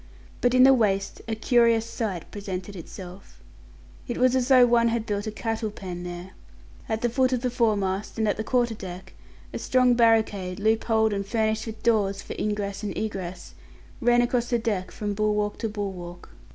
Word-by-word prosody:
But 245 Hz, 0 st, +3 dB
in 255 Hz, -, +7 dB
the 270 Hz, +1 st, +8 dB
waist 200 Hz, -5 st, 0 dB
a 225 Hz, -, -1 dB
curious 230 Hz, 0 st, +3 dB
sight 210 Hz, -7 st, -4 dB
presented 200 Hz, -1 st, -6 dB
itself. 185 Hz, +2 st, -10 dB, 0.7 s
It 240 Hz, -, -3 dB
was 255 Hz, 0 st, +3 dB
as 255 Hz, -1 st, +1 dB
though 255 Hz, -2 st, +7 dB
one 235 Hz, -1 st, +3 dB
had 230 Hz, -1 st, -1 dB
built 205 Hz, 0 st, -2 dB
a -, -, -2 dB
cattle 225 Hz, 0 st, -3 dB
pen 185 Hz, -4 st, -7 dB
there. 175 Hz, +1 st, -7 dB, 0.6 s
At 220 Hz, 0 st, -1 dB
the -, -, +4 dB
foot 255 Hz, +2 st, +1 dB
of 250 Hz, -, 0 dB
the 250 Hz, -, 0 dB
foremast, 205 Hz, -5 st, 0 dB
and 220 Hz, -1 st, +1 dB
at 205 Hz, -, +1 dB
the 220 Hz, -, -3 dB
quarter 240 Hz, -1 st, +1 dB
deck, 185 Hz, -3 st, -9 dB, 0.4 s
a -, -, -3 dB
strong 255 Hz, -1 st, +3 dB
barricade, 220 Hz, -6 st, +2 dB
loop 220 Hz, +2 st, +1 dB
holed 220 Hz, -2 st, +2 dB
and 200 Hz, 0 st, -1 dB
furnished 220 Hz, +2 st, -1 dB
with 220 Hz, 0 st, -8 dB
doors 205 Hz, -4 st, +2 dB
for -, -, -6 dB
ingress 205 Hz, -1 st, -2 dB
and 210 Hz, -, -4 dB
egress, 190 Hz, -4 st, -5 dB, 0.5 s
ran 240 Hz, -1 st, +4 dB
across 240 Hz, 0 st, 0 dB
the 240 Hz, -, +2 dB
deck 205 Hz, -5 st, -2 dB
from 205 Hz, -1 st, -4 dB
bulwark 210 Hz, 0 st, 0 dB
to 225 Hz, -, -2 dB
bulwark. 185 Hz, -4 st, -6 dB
220 Hz, 190 wpm, -25 LUFS, 195-235 Hz, 0.7 s, the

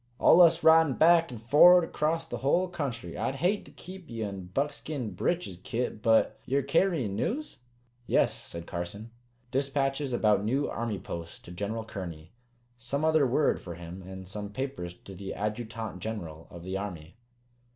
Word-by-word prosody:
"Allus 170 Hz, -1 st, +6 dB
ridin' 160 Hz, -4 st, +6 dB
back 165 Hz, +1 st, +5 dB
and 120 Hz, -, -8 dB
forerd 160 Hz, +10 st, +7 dB
acrost 165 Hz, +1 st, -1 dB
the -, -, -3 dB
hull 175 Hz, +7 st, +2 dB
country. 140 Hz, -9 st, -5 dB
I'd 135 Hz, -, -2 dB
hate 180 Hz, +9 st, 0 dB
to -, -, -14 dB
keep 185 Hz, -1 st, -11 dB
ye 115 Hz, -2 st, -4 dB
in 100 Hz, -3 st, -5 dB
buckskin 140 Hz, +2 st, -3 dB
breeches, 170 Hz, -, -2 dB
Kit. 115 Hz, -2 st, -3 dB
But 115 Hz, -1 st, +3 dB
ye're 140 Hz, +1 st, 0 dB
carryin' 140 Hz, -, +1 dB
news?" 275 Hz, -, -3 dB, 0.5 s
"Yes," -, -, +3 dB
said 85 Hz, 0 st, -8 dB
Carson. 95 Hz, +6 st, -6 dB, 0.4 s
"Dispatches 135 Hz, 0 st, 0 dB
about 105 Hz, -4 st, +2 dB
new 135 Hz, +7 st, 0 dB
Army 115 Hz, -3 st, -3 dB
posts 85 Hz, -1 st, -7 dB
to 90 Hz, -, -12 dB
General 105 Hz, +5 st, -3 dB
Kearny. 85 Hz, -6 st, -7 dB, 0.5 s
Some 140 Hz, +6 st, -2 dB
other 155 Hz, -3 st, +4 dB
word 140 Hz, +4 st, +2 dB
for 85 Hz, -2 st, -7 dB
him, 85 Hz, +2 st, -9 dB
and 95 Hz, 0 st, -9 dB
some 105 Hz, +1 st, -5 dB
papers 130 Hz, -9 st, -4 dB
to 95 Hz, -, -12 dB
the 95 Hz, +1 st, -6 dB
Adjutant 110 Hz, -1 st, -4 dB
General 85 Hz, -6 st, -6 dB
of 85 Hz, -1 st, -10 dB
the 95 Hz, +1 st, -3 dB
Army. 90 Hz, -5 st, -7 dB
115 Hz, 160 wpm, -29 LUFS, 95-150 Hz, 0.5 s, forerd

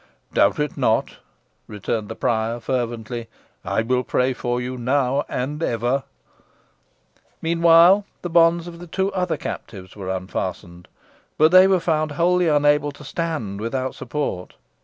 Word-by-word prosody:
"Doubt -, -, +3 dB
it 150 Hz, -1 st, -2 dB
not," -, -, +1 dB, 0.5 s
returned 105 Hz, +1 st, -4 dB
the 110 Hz, -, -5 dB
prior, 115 Hz, +1 st, -1 dB
fervently. 120 Hz, -2 st, -3 dB, 0.4 s
"I 110 Hz, -, 0 dB
will 125 Hz, +2 st, +1 dB
pray 130 Hz, +1 st, 0 dB
for 120 Hz, -1 st, -2 dB
you 125 Hz, +1 st, -4 dB
now 130 Hz, +2 st, +1 dB
and 145 Hz, +5 st, -3 dB
ever." 120 Hz, 0 st, 0 dB, 1.3 s
Meanwhile, 170 Hz, +4 st, +5 dB, 0.2 s
the 175 Hz, -, -3 dB
bonds 170 Hz, 0 st, +4 dB
of 170 Hz, -1 st, -9 dB
the 175 Hz, -, -10 dB
two 190 Hz, +4 st, -1 dB
other 180 Hz, -2 st, -1 dB
captives 95 Hz, -4 st, -7 dB
were 95 Hz, -3 st, -6 dB
unfastened, 90 Hz, -2 st, -5 dB, 0.5 s
but 155 Hz, +1 st, +5 dB
they 185 Hz, +1 st, +8 dB
were 190 Hz, -1 st, +3 dB
found 155 Hz, -3 st, 0 dB
wholly 175 Hz, +3 st, +2 dB
unable 145 Hz, -1 st, +3 dB
to 145 Hz, -, -14 dB
stand 135 Hz, -, -4 dB
without 130 Hz, +3 st, -2 dB
support. 125 Hz, -9 st, -4 dB
135 Hz, 140 wpm, -22 LUFS, 115-165 Hz, 1.3 s, they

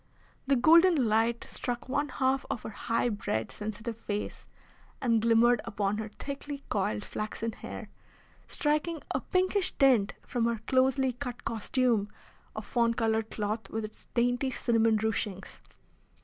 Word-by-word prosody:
The 275 Hz, -, +4 dB
golden 320 Hz, 0 st, +6 dB
light 225 Hz, +2 st, +2 dB
struck 245 Hz, 0 st, -4 dB
one 285 Hz, +2 st, 0 dB
half 265 Hz, 0 st, +1 dB
of 225 Hz, -, -3 dB
her -, -, -6 dB
high 230 Hz, +3 st, 0 dB
bred, 110 Hz, -, -2 dB
sensitive 215 Hz, +2 st, -5 dB
face, 210 Hz, -2 st, -5 dB, 0.5 s
and 230 Hz, -3 st, +2 dB
glimmered 235 Hz, +1 st, +4 dB
upon 205 Hz, 0 st, -1 dB
her 220 Hz, 0 st, -4 dB
thickly 280 Hz, +5 st, -6 dB
coiled 110 Hz, -, -1 dB
flaxen 215 Hz, +1 st, -4 dB
hair, -, -, -8 dB, 0.6 s
striking 305 Hz, +2 st, 0 dB
a -, -, 0 dB
pinkish 370 Hz, +1 st, +1 dB
tint 250 Hz, -7 st, +4 dB
from 240 Hz, -2 st, 0 dB
her 235 Hz, 0 st, +1 dB
closely 260 Hz, 0 st, +2 dB
cut 250 Hz, -1 st, -6 dB
costume 230 Hz, -1 st, +1 dB, 0.5 s
of -, -, -5 dB
fawn 235 Hz, -2 st, +1 dB
coloured 225 Hz, -1 st, 0 dB
cloth 215 Hz, +1 st, -3 dB
with 220 Hz, 0 st, -3 dB
its 215 Hz, -, -12 dB
dainty 245 Hz, +2 st, +2 dB
cinnamon 230 Hz, -3 st, +2 dB
ruchings. 210 Hz, -3 st, -3 dB
235 Hz, 140 wpm, -29 LUFS, 215-265 Hz, 0.6 s, golden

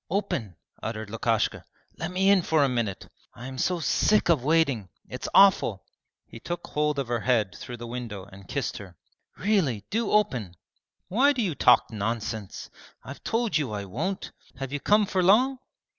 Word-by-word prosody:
'Open!' 160 Hz, -, -2 dB, 0.3 s
uttered 110 Hz, -2 st, -5 dB
Lukashka. 115 Hz, -1 st, 0 dB, 0.4 s
'Let 160 Hz, +2 st, -3 dB
me 190 Hz, +2 st, +3 dB
in 200 Hz, -2 st, +5 dB
for 160 Hz, -3 st, +2 dB
a -, -, +3 dB
minute. 115 Hz, -7 st, -2 dB, 0.3 s
I 120 Hz, -, -9 dB
am 130 Hz, -1 st, -7 dB
so 180 Hz, -1 st, +1 dB
sick 205 Hz, +5 st, +2 dB
of 155 Hz, -7 st, +3 dB
waiting! 140 Hz, -, +2 dB, 0.2 s
It's 125 Hz, -, -6 dB
awful!' 185 Hz, -, +5 dB, 0.4 s
He 115 Hz, -, -12 dB
took 175 Hz, +8 st, -5 dB
hold 150 Hz, 0 st, -1 dB
of 135 Hz, -3 st, -2 dB
her 120 Hz, 0 st, -1 dB
head 110 Hz, -5 st, +1 dB
through 120 Hz, +3 st, -8 dB
the 120 Hz, -, -8 dB
window 115 Hz, -5 st, -6 dB
and 100 Hz, -2 st, -14 dB
kissed -, -, -3 dB
her. 95 Hz, -5 st, -12 dB, 0.4 s
'Really, 170 Hz, -, +1 dB
do 225 Hz, 0 st, 0 dB
open!' 125 Hz, -, +1 dB, 0.5 s
'Why 265 Hz, +9 st, +3 dB
do 245 Hz, -, -1 dB
you 180 Hz, -6 st, -1 dB
talk 125 Hz, -4 st, +4 dB
nonsense? 110 Hz, -1 st, -4 dB, 0.3 s
I've 140 Hz, -, -10 dB
told 230 Hz, -7 st, 0 dB
you 130 Hz, -8 st, -3 dB
I 100 Hz, -1 st, -4 dB
won't! 165 Hz, -, -4 dB, 0.2 s
Have 135 Hz, +1 st, -6 dB
you 145 Hz, -, -1 dB
come 210 Hz, +7 st, +3 dB
for 190 Hz, -1 st, 0 dB
long?' 250 Hz, +9 st, +4 dB
135 Hz, 175 wpm, -26 LUFS, 110-185 Hz, 0.5 s, in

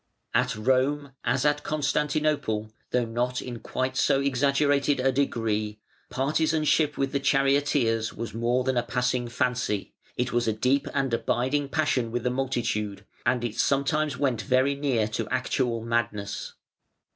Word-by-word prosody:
] -, -, -51 dB
At -, -, +2 dB
Rome, 130 Hz, +5 st, +1 dB
as 130 Hz, +2 st, +1 dB
at 145 Hz, 0 st, +2 dB
Constantinople, 150 Hz, -7 st, 0 dB, 0.2 s
though 125 Hz, -1 st, +1 dB
not 120 Hz, +2 st, -1 dB
in 120 Hz, -2 st, -6 dB
quite 130 Hz, +3 st, -2 dB
so 135 Hz, +1 st, +3 dB
exaggerated 140 Hz, +1 st, +2 dB
a 135 Hz, +1 st, +3 dB
degree, 110 Hz, -5 st, -1 dB, 0.3 s
partisanship 155 Hz, +2 st, +1 dB
with 135 Hz, -1 st, 0 dB
the 140 Hz, -, 0 dB
charioteers 135 Hz, -4 st, +2 dB
was 115 Hz, -2 st, -6 dB
more 120 Hz, +3 st, +1 dB
than 130 Hz, -1 st, 0 dB
a -, -, +4 dB
passing 125 Hz, 0 st, -1 dB
fancy; 125 Hz, -4 st, -1 dB, 0.2 s
it 125 Hz, 0 st, 0 dB
was 120 Hz, 0 st, +1 dB
a 110 Hz, -, +2 dB
deep 130 Hz, +6 st, +1 dB
and 135 Hz, -3 st, 0 dB
abiding 130 Hz, +4 st, 0 dB
passion 135 Hz, -7 st, 0 dB
with 120 Hz, 0 st, -2 dB
the 125 Hz, -, +1 dB
multitude, 115 Hz, -6 st, -2 dB, 0.2 s
and 125 Hz, -1 st, +2 dB
it 115 Hz, -2 st, -3 dB
sometimes 140 Hz, +1 st, +1 dB
went 130 Hz, -5 st, 0 dB
very 130 Hz, +6 st, +2 dB
near 135 Hz, -6 st, 0 dB
to 110 Hz, -, -3 dB
actual 125 Hz, -2 st, 0 dB
madness. 105 Hz, -3 st, -2 dB
130 Hz, 150 wpm, -26 LUFS, 115-140 Hz, 0.3 s, a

